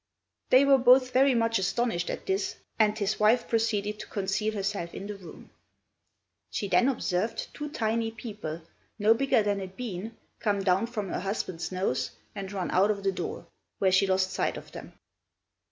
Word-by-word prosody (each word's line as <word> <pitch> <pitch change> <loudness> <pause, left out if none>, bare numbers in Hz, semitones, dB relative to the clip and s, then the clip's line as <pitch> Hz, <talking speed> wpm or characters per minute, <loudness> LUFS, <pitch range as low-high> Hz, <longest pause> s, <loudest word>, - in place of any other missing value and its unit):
They 260 +2 +6
were 275 -1 +6
both 255 +1 +6
very 265 0 +5
much 230 -2 +2
astonished 195 -1 0
at - - -5
this, 195 +1 -1 0.2
and 215 -1 +3
his 205 0 -1
wife 225 +3 +4
proceeded 210 -2 0
to - - -7
conceal 210 +2 -1
herself 195 -4 -3
in 195 - -6
the 205 0 -5
room. 185 -5 -13 1.0
She 205 - -3
then 245 +6 +4
observed 225 -3 -2
two 295 0 -5
tiny 225 -3 0
people, 210 -8 -7 0.3
no 215 +1 +5
bigger 255 -1 +2
than 205 -1 0
a 190 - -4
bean, 215 +1 -6 0.2
come 200 -2 0
down 190 +4 +2
from 210 -5 -4
her - - -2
husband's 185 -4 -3
nose 185 -8 -1 0.2
and 195 -2 -6
run 190 -3 -3
out 195 +3 +4
of 200 -2 -1
the 195 - +2
door, 180 -1 -5 0.3
where 190 -1 +2
she 190 +1 +4
lost 190 0 +1
sight 190 - -1
of - - -11
them. - - -10
205 Hz, 180 wpm, -28 LUFS, 190-230 Hz, 1.0 s, They